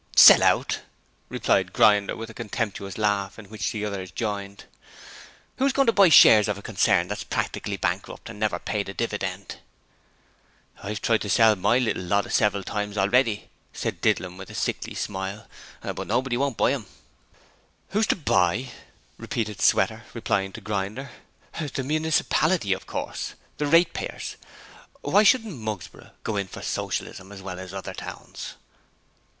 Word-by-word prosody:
'Sell -, -, +10 dB
out!' -, -, +2 dB, 0.5 s
replied -, -, +1 dB
Grinder 105 Hz, -2 st, +4 dB
with 115 Hz, -, -6 dB
a 110 Hz, -, -11 dB
contemptuous 105 Hz, -3 st, -4 dB
laugh 100 Hz, -2 st, 0 dB
in 110 Hz, -, -10 dB
which 110 Hz, -2 st, -2 dB
the 105 Hz, -1 st, -3 dB
others 95 Hz, -3 st, -4 dB
joined. 100 Hz, +2 st, -4 dB, 0.9 s
'Who's 270 Hz, 0 st, +2 dB
going 275 Hz, 0 st, +3 dB
to 230 Hz, -, +5 dB
buy 200 Hz, -3 st, +6 dB
the -, -, +6 dB
shares 110 Hz, -8 st, +8 dB
of 105 Hz, -2 st, -1 dB
a 100 Hz, -, -11 dB
concern -, -, +2 dB
that's -, -, -4 dB
practically -, -, -3 dB
bankrupt -, -, -3 dB
and 105 Hz, -, -9 dB
never 110 Hz, -1 st, 0 dB
paid 100 Hz, -2 st, -3 dB
a 100 Hz, -, -7 dB
dividend?' 100 Hz, -4 st, -3 dB, 1.2 s
'I've 105 Hz, +1 st, -5 dB
tried 115 Hz, -1 st, +2 dB
to 105 Hz, -, -4 dB
sell 110 Hz, +1 st, +5 dB
my 115 Hz, +6 st, +2 dB
little 125 Hz, -6 st, 0 dB
lot 100 Hz, +3 st, 0 dB
several 100 Hz, -2 st, +2 dB
times 105 Hz, +1 st, -4 dB
already,' 105 Hz, +2 st, +2 dB, 0.2 s
said -, -, -4 dB
Didlum 90 Hz, -1 st, 0 dB
with 95 Hz, 0 st, -9 dB
a -, -, -10 dB
sickly -, -, -2 dB
smile, 100 Hz, +2 st, -4 dB, 0.4 s
'but -, -, -4 dB
nobody 125 Hz, +2 st, 0 dB
won't 135 Hz, -1 st, -1 dB
buy 130 Hz, -, +3 dB
'em.' 120 Hz, -8 st, -5 dB, 1.0 s
'Who's 215 Hz, +2 st, +1 dB
to -, -, +3 dB
buy?' 120 Hz, -, +1 dB, 0.5 s
repeated 105 Hz, -3 st, -3 dB
Sweater, 110 Hz, +3 st, +2 dB
replying 100 Hz, -4 st, -1 dB
to 115 Hz, -, -8 dB
Grinder. 105 Hz, +6 st, -4 dB, 0.5 s
'The 145 Hz, -4 st, -3 dB
municipality 155 Hz, -, +1 dB
of 95 Hz, -, -7 dB
course! -, -, -4 dB, 0.2 s
The 150 Hz, -, -1 dB
ratepayers. 165 Hz, +4 st, +1 dB, 0.6 s
Why 205 Hz, -, +4 dB
shouldn't 215 Hz, -, +3 dB
Mugsborough 110 Hz, -5 st, -6 dB
go 110 Hz, -, -2 dB
in 100 Hz, -1 st, -1 dB
for -, -, -9 dB
Socialism 95 Hz, +1 st, -4 dB
as 95 Hz, -1 st, -10 dB
well 90 Hz, -1 st, -6 dB
as 95 Hz, 0 st, -8 dB
other 95 Hz, -1 st, -6 dB
towns?' -, -, -8 dB
105 Hz, 155 wpm, -25 LUFS, 100-125 Hz, 1.2 s, Sell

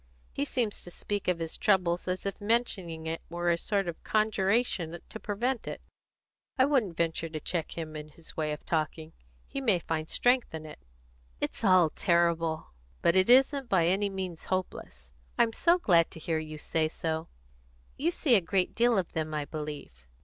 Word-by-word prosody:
He 140 Hz, -, -1 dB
seems 225 Hz, -, -1 dB
to -, -, -11 dB
speak 205 Hz, +3 st, -4 dB
of 180 Hz, -2 st, +2 dB
his 165 Hz, -1 st, -4 dB
trouble 180 Hz, -4 st, +3 dB
as 185 Hz, +1 st, -2 dB
if 200 Hz, 0 st, -3 dB
mentioning 200 Hz, -7 st, 0 dB
it 160 Hz, +1 st, -3 dB
were 175 Hz, +1 st, 0 dB
a -, -, +3 dB
sort 200 Hz, -1 st, 0 dB
of 170 Hz, -, -6 dB
conjuration 200 Hz, -5 st, +1 dB
to 220 Hz, -, -8 dB
prevent 235 Hz, +5 st, -2 dB
it. -, -, -5 dB, 0.8 s
I 260 Hz, -, +6 dB
wouldn't 240 Hz, -, +1 dB
venture 165 Hz, 0 st, -1 dB
to 155 Hz, -1 st, -5 dB
check 165 Hz, +1 st, -3 dB
him 155 Hz, -2 st, -5 dB
in 150 Hz, 0 st, -6 dB
his 160 Hz, +2 st, -15 dB
way 155 Hz, -1 st, -1 dB
of 150 Hz, -, -6 dB
talking. 160 Hz, 0 st, -2 dB, 0.3 s
He 275 Hz, -, -5 dB
may 220 Hz, -8 st, +3 dB
find 160 Hz, -2 st, -3 dB
strength 245 Hz, -7 st, +2 dB
in 155 Hz, -1 st, -7 dB
it." 155 Hz, -, -10 dB, 0.6 s
"It's -, -, -3 dB
all 185 Hz, -6 st, +5 dB
terrible!" 170 Hz, -, +1 dB, 0.3 s
"But 170 Hz, -, +4 dB
it 185 Hz, +3 st, +4 dB
isn't 265 Hz, +1 st, +5 dB
by 175 Hz, -4 st, +4 dB
any 195 Hz, +4 st, +2 dB
means 185 Hz, -4 st, -5 dB
hopeless." 65 Hz, -, -4 dB, 0.3 s
"I'm 230 Hz, -1 st, +3 dB
so 340 Hz, +7 st, +4 dB
glad 170 Hz, -, +4 dB
to -, -, -10 dB
hear 160 Hz, 0 st, -1 dB
you 155 Hz, -1 st, -7 dB
say 155 Hz, +1 st, 0 dB
so. 160 Hz, 0 st, -3 dB, 0.7 s
You 315 Hz, +5 st, +1 dB
see 315 Hz, -6 st, +2 dB
a 210 Hz, -, +6 dB
great 185 Hz, +2 st, 0 dB
deal 235 Hz, -1 st, +3 dB
of 185 Hz, -3 st, -1 dB
them, 155 Hz, -1 st, -3 dB
I 150 Hz, -1 st, -1 dB
believe?" 145 Hz, -, -7 dB
175 Hz, 185 wpm, -29 LUFS, 160-210 Hz, 0.8 s, I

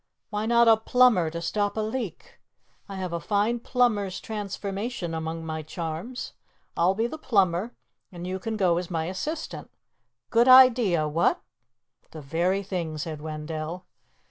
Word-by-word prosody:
Why 210 Hz, +1 st, -2 dB
not 235 Hz, 0 st, +5 dB
a 225 Hz, -1 st, +7 dB
plumber 225 Hz, -6 st, +4 dB
to 170 Hz, +1 st, -5 dB
stop 205 Hz, +4 st, -1 dB
a -, -, +1 dB
leak? 215 Hz, -4 st, -5 dB, 0.5 s
I 195 Hz, -, -6 dB
have 185 Hz, -2 st, -4 dB
a 170 Hz, -, -1 dB
fine 210 Hz, +6 st, 0 dB
plumber's 220 Hz, -6 st, 0 dB
transformation 200 Hz, -2 st, -4 dB
among 160 Hz, 0 st, -4 dB
my 160 Hz, 0 st, -4 dB
charms. 165 Hz, +9 st, -6 dB, 0.4 s
I'll 180 Hz, +3 st, +2 dB
be 225 Hz, +3 st, 0 dB
the 310 Hz, +6 st, -5 dB
plumber 195 Hz, -, +1 dB, 0.4 s
and 175 Hz, -1 st, -8 dB
you 185 Hz, +1 st, -3 dB
can 220 Hz, +3 st, -4 dB
go 175 Hz, -4 st, +2 dB
as 180 Hz, -, -6 dB
my 165 Hz, -3 st, -2 dB
assistant. 300 Hz, -, -5 dB, 0.6 s
Good 235 Hz, +2 st, +4 dB
idea, 245 Hz, -11 st, +6 dB
what?" 165 Hz, +3 st, +1 dB, 0.7 s
"The 155 Hz, -, -9 dB
very 175 Hz, +7 st, 0 dB
thing," 175 Hz, -5 st, -4 dB
said 155 Hz, 0 st, -5 dB
Wendell. 155 Hz, +3 st, -5 dB
190 Hz, 150 wpm, -26 LUFS, 165-225 Hz, 0.7 s, a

